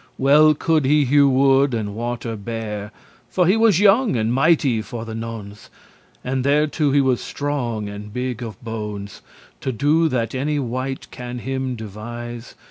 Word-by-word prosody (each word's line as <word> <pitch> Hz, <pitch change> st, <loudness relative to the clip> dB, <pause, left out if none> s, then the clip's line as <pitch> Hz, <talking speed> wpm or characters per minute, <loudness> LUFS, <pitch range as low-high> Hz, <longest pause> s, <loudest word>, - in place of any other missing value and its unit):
Well 150 Hz, +3 st, +5 dB
could 160 Hz, 0 st, +1 dB
he 145 Hz, +1 st, +4 dB
hewe 140 Hz, +2 st, +5 dB
wood, 135 Hz, 0 st, +3 dB
and 105 Hz, -3 st, -3 dB
water 115 Hz, 0 st, -4 dB
bear, 105 Hz, -1 st, -5 dB, 0.4 s
For 180 Hz, -, +2 dB
he 185 Hz, +5 st, +4 dB
was 225 Hz, -5 st, +4 dB
young 210 Hz, -, +4 dB
and 115 Hz, 0 st, 0 dB
mighty 135 Hz, -4 st, +3 dB
for 115 Hz, +1 st, -7 dB
the 115 Hz, -, -7 dB
nones*, 110 Hz, -2 st, -7 dB, 0.6 s
*occasion 130 Hz, -, -2 dB
And 130 Hz, -1 st, 0 dB
thereto 150 Hz, +1 st, +2 dB
he 140 Hz, +1 st, +4 dB
was 130 Hz, -3 st, +1 dB
strong 125 Hz, -7 st, -3 dB
and 105 Hz, +1 st, -8 dB
big 125 Hz, +1 st, -3 dB
of 110 Hz, -5 st, -7 dB
bones 105 Hz, -3 st, -6 dB, 0.4 s
To 130 Hz, -, -2 dB
do 150 Hz, +7 st, +2 dB
that 120 Hz, -4 st, -1 dB
any 145 Hz, +3 st, -1 dB
wight 130 Hz, 0 st, -3 dB
can 125 Hz, 0 st, -7 dB
him 130 Hz, +1 st, -3 dB
devise. 120 Hz, +2 st, -8 dB
125 Hz, 165 wpm, -21 LUFS, 115-145 Hz, 0.6 s, Well